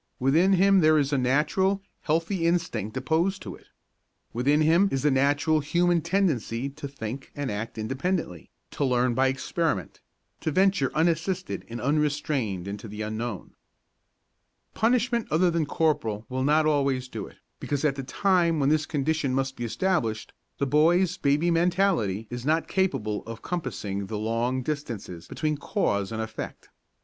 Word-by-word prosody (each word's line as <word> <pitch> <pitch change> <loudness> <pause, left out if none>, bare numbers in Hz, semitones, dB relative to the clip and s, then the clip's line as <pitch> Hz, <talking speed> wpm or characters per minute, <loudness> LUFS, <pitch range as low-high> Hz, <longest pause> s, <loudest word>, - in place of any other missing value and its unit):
Within 160 +9 +4
him 195 +1 +5
there 155 -2 +5
is 145 -1 +1
a - - +3
natural, 190 +10 +1 0.2
healthy 165 +3 0
instinct 145 - -1
opposed 175 +5 0
to - - -6
it. - - -16 0.7
Within 140 +6 +2
him 170 +6 +4
is 135 - -1
the 150 - +4
natural 145 +3 +2
human 170 +3 +2
tendency 150 - 0
to 140 +1 -7
think 135 -1 -7
and 145 -3 -3
act 110 +3 -5
independently, 130 - -3 0.2
to - - -2
learn 125 -2 +2
by 135 +2 +3
experiment, 135 - -2 0.4
to 160 - -2
venture 185 -4 +2
unassisted 170 +3 0
and 120 +1 -5
unrestrained 140 - 0
into 105 +2 -6
the 105 +1 -5
unknown. 110 -1 -5 1.2
Punishment 235 0 +1
other 170 +3 +3
than 165 -3 0
corporal 115 -10 0
will 130 0 -2
not 155 +3 +3
always 140 -4 +1
do 110 -5 -6
it, - - -17 0.2
because 145 +1 -2
at 140 -2 +2
the 135 - -4
time 170 +3 +2
when 140 -1 +2
this 155 0 +2
condition 145 -2 0
must 135 0 -1
be 120 - -4
established 115 - -1 0.2
the 140 - 0
boy's 170 +6 +3
baby 150 +5 +2
mentality 170 - +1
is 120 0 -5
not 160 +4 +1
capable 110 - 0
of 115 0 -8
compassing 100 - -3
the 105 - -4
long 115 +4 -1
distances 120 - -5
between 155 -1 -2
cause 100 - -1
and 110 0 -2
effect. 110 0 -7
145 Hz, 155 wpm, -26 LUFS, 120-170 Hz, 1.2 s, him